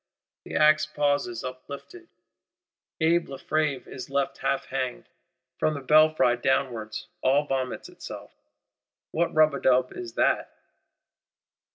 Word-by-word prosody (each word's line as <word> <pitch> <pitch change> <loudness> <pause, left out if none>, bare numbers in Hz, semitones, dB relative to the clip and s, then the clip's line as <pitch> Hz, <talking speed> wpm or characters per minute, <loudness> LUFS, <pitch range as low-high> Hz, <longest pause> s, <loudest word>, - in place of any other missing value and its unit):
The - - -7
axe 155 0 +5
pauses 145 -6 0
uplifted; 140 - -9 0.9
Abbé 165 +1 +2
Lefevre 140 -1 -1
is 130 - -8
left 140 0 -1
half 135 0 0
hanged; 130 -2 -3 0.5
from 155 - +1
the - - -4
belfry 155 -3 +4
downwards 120 -4 -1 0.2
all 140 +3 +3
vomits 130 -2 -3
itself. - - -10 0.8
What 170 +1 0
rub 155 -1 +4
a 140 - -3
dub 130 0 +3
is 115 -2 -7
that? - - +1
140 Hz, 115 wpm, -26 LUFS, 130-155 Hz, 0.9 s, axe